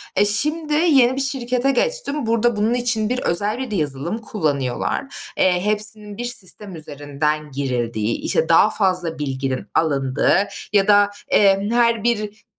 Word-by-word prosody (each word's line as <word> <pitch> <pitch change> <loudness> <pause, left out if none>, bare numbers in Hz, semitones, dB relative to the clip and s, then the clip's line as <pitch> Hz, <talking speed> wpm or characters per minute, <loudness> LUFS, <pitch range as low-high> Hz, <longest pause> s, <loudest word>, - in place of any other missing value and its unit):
E, 205 - +3
şimdi 300 +9 +1
yeni 280 -6 +3
bir 270 - +1
şirkete 260 -1 0
geçtim. 300 - 0
Burada 230 0 +1
bunun 215 +3 0
için 240 -3 0
bir 250 - -1
özel 205 +4 0
bir 225 -7 -4
yazılım 150 +6 0
kullanıyorlar. 155 - -3 0.2
Eee, 180 -1 +2
hepsinin 210 -1 0
bir 240 - -4
sistem 210 -4 -1
üzerinden 150 0 -3
girildiği, 120 -5 -2
işte, 160 - +1
daha 165 +6 +5
fazla 180 -6 -1
bilginin 135 -2 -4
alındığı 145 +5 +1 0.3
ya 200 -2 +3
da, 205 -1 +5 0.2
eee, 195 0 +3
her 235 -2 +2
bir, 215 -2 -2
205 Hz, 145 wpm, -20 LUFS, 155-240 Hz, 0.3 s, daha